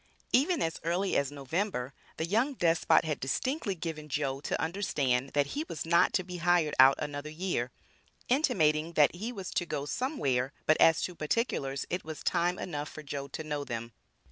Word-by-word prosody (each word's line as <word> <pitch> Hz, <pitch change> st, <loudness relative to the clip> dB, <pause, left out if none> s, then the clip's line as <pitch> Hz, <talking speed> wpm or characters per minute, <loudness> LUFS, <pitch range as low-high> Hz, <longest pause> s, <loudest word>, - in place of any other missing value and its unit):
Even 310 Hz, +6 st, +3 dB
as 165 Hz, -, -2 dB
early 180 Hz, +4 st, 0 dB
as 140 Hz, 0 st, +1 dB
November, 140 Hz, -1 st, -2 dB, 0.2 s
the 160 Hz, -, -1 dB
young 230 Hz, +10 st, +1 dB
despot 165 Hz, -4 st, +3 dB
had 155 Hz, -3 st, -2 dB
distinctly 230 Hz, -, -1 dB
given 160 Hz, -3 st, -5 dB
"Joe" 135 Hz, -1 st, -1 dB
to -, -, -2 dB
understand, 145 Hz, -8 st, 0 dB
that 145 Hz, -1 st, +3 dB
he 300 Hz, -, -1 dB
was 160 Hz, -, -4 dB
not 170 Hz, +1 st, +4 dB
to 185 Hz, -, +1 dB
be 180 Hz, 0 st, -7 dB
hired 170 Hz, -3 st, +2 dB
out 135 Hz, +1 st, +9 dB
another 145 Hz, 0 st, -4 dB
year, 155 Hz, -6 st, -2 dB, 0.6 s
intimating 170 Hz, -, +2 dB
that 150 Hz, -3 st, +5 dB
he 210 Hz, +7 st, -4 dB
was 195 Hz, -6 st, -6 dB
to 175 Hz, -, 0 dB
"go 145 Hz, -3 st, -3 dB
somewhere," 140 Hz, -, -1 dB
but 155 Hz, -, +3 dB
as 165 Hz, -1 st, +6 dB
to 180 Hz, -, -2 dB
particulars, 150 Hz, -, -1 dB
it 180 Hz, -, -1 dB
was 155 Hz, -1 st, -7 dB
time 175 Hz, +1 st, +1 dB
enough 150 Hz, -3 st, -4 dB
for 155 Hz, -, -9 dB
Joe 140 Hz, -1 st, -5 dB
to 160 Hz, -, -6 dB
know 150 Hz, -2 st, -3 dB
them. 115 Hz, -3 st, -5 dB
160 Hz, 185 wpm, -30 LUFS, 145-185 Hz, 0.6 s, out